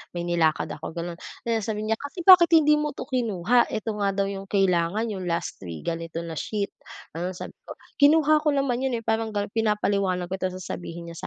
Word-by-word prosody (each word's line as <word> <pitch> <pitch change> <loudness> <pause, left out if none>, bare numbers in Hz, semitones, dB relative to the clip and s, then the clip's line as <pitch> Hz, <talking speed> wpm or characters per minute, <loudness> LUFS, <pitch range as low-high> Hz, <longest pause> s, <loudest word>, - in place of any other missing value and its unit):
may 175 - -2
nilakad 170 -3 +1
ako, 160 +2 -7
gano'n. 170 0 -5 0.3
Tas 225 -2 0
sasabihin 215 0 -2
niya, - - -4
"Kasi 310 +5 -7
bakit 360 -2 +10
hindi 300 -1 +5
mo 300 -1 -1
'to - - -5
kinuha 240 - +2
ito 220 +1 -2
nga 200 -1 +2
daw 200 - +1
yung 195 0 -6
kailangan 195 +2 +1
yung 185 -3 -5
last 170 0 -2
week, 85 -3 -7
ganito 165 0 -3
na 165 - -6
sheet". 205 -2 -3 0.4
Ano 180 +2 -3
sabi - - -7 0.2
ko, - - -7 0.2
"Kinuha 305 +1 +5
ko 300 - +3
naman 260 -3 0
'yon, 260 -3 0
eh", - - -13
parang 220 -1 -1
ganon 205 0 -2
pinapaliwanag 200 -5 0
ko - - 0
tapos 185 -1 -2
sasabihin 170 -2 -7
niya 170 - -11
200 Hz, 210 wpm, -25 LUFS, 175-235 Hz, 0.4 s, bakit